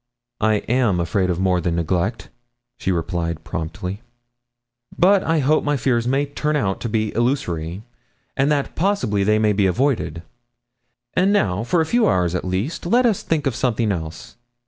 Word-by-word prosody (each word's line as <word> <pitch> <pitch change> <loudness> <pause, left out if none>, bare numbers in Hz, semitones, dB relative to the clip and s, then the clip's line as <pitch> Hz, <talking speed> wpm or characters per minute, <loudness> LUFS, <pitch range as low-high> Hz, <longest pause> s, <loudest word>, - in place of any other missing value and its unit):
'I 110 0 +3
am 120 -7 +2
afraid 90 +2 0
of 90 -1 -1
more 90 -1 +2
than 85 0 -1
neglect,' 90 +6 -1 0.5
she 95 - -1
replied 85 -1 -2
promptly; 90 +5 -5 1.0
'but 195 +2 +4
I 165 0 +1
hope 150 +2 +2
my 145 -1 +1
fears 120 -2 0
may 135 +3 +1
turn 150 +1 -2
out 100 -9 -1
illusory, 110 - -1 0.5
and 140 +2 +2
that 145 -2 -1
possibly 155 - +1
they 105 +2 +3
may 110 -1 +2
be 100 -1 +2
avoided. 95 - 0 0.9
And 185 +2 +3
now, 105 - +1
for 165 +8 +1
a - - +1
few 225 +5 +2
hours 90 -2 +1
at 90 - -2
least, 100 - -3
let 245 +7 +3
us 220 -5 +2
think 155 -2 -1
of 135 - +1
something 115 -3 0
else. 80 0 -6
110 Hz, 165 wpm, -21 LUFS, 90-145 Hz, 1.0 s, but